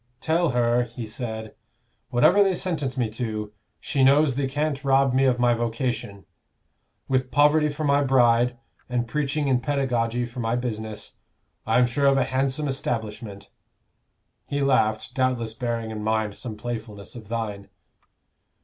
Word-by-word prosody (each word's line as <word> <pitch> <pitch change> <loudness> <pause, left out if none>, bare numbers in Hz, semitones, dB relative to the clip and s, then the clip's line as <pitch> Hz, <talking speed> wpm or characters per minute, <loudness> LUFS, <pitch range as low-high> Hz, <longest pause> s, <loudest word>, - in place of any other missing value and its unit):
'Tell 165 +3 +1
her,' 120 -1 +2
he 120 0 -7
said, 110 0 -6 0.6
'whatever 155 +11 +5
they 190 -2 +1
sentence 150 -8 -2
me 120 -3 +1
to, 110 -2 -4 0.3
she 140 -3 0
knows 140 +1 +5
they 135 +1 -1
can't 145 +1 -2
rob 135 -1 +3
me 135 +1 +3
of 125 -2 +3
my 120 0 +3
vocation. 115 -4 -3 0.8
With 130 -1 0
poverty 150 +3 +4
for 145 +1 -4
my 140 -1 +3
bride, 120 -2 +3 0.3
and 120 -1 -1
preaching 145 +3 -1
and 130 -2 +2
pedagoguy 125 -3 0
for 120 +1 -9
my 115 0 0
business, 110 -3 -4 0.5
I - - +3
am 125 - +5
sure 140 +4 +1
of 135 0 +4
a 135 - +3
handsome 135 +3 -1
establishment.' 110 -6 -4 1.0
He 140 0 -1
laughed 125 -2 +1
doubtless 125 -4 0
bearing 115 -1 -3
in 105 -1 -5
mind 110 -1 0
some 110 -4 -7
playfulness 110 -3 -6
of 110 -4 -10
thine." 105 -3 -4
125 Hz, 150 wpm, -25 LUFS, 115-135 Hz, 1.0 s, whatever